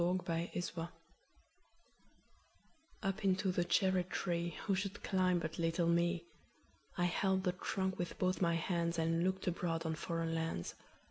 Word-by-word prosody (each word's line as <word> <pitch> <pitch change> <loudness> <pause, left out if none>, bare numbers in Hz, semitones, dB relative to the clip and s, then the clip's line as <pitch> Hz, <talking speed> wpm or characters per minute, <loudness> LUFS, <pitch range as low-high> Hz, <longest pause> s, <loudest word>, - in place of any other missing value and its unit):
9. 180 +2 +3
Foreign 170 -1 -2
Lands 175 - -2 2.3
UP 195 +1 -1
into 190 0 +3
the 175 -1 +1
cherry 185 +1 +3
treeWho 175 +1 -1
should 200 +1 -3
climb 185 -2 +3
but 160 -1 -3
little 165 +1 +2
me?I 170 +1 -2
held 190 +2 +2
the 180 - +2
trunk 190 +1 -2
with 175 - -3
both 185 0 +1
my 170 -2 +3
handsAnd 170 -1 +1
looked 190 +1 0
abroad 170 -2 -1
on 160 - 0
foreign 165 +1 -2
lands. 165 - -2
175 Hz, 135 wpm, -36 LUFS, 170-185 Hz, 2.3 s, 9